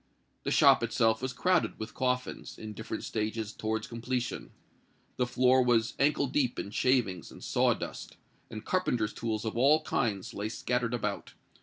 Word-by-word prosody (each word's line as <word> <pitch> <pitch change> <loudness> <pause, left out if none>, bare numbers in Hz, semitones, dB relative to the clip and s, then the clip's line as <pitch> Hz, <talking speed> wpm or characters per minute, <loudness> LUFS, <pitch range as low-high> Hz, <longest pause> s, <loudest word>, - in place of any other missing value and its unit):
The - - 0
shop - - +6
itself 110 0 +2
was 130 0 -2
crowded 175 +8 +1
with 110 - -6
coffins, 125 -1 -2
in 110 -1 -7
different 110 +1 -5
stages 110 0 -3
towards 110 0 -2
completion: 120 - -3 0.7
the 125 - +1
floor 125 +1 +4
was 120 -1 +2
ankle 145 0 +3
deep 130 -2 0
in 100 - -4
shavings 110 - +1
and - - -12
sawdust; - - -1 0.3
and 110 -1 -8
carpenters' 120 -12 0
tools 110 -1 -3
of 110 - -3
all 145 +6 +4
kinds 110 -11 -1
lay 105 +2 -3
scattered 125 +1 -1
about. 105 -3 -4
115 Hz, 155 wpm, -30 LUFS, 110-125 Hz, 0.7 s, shop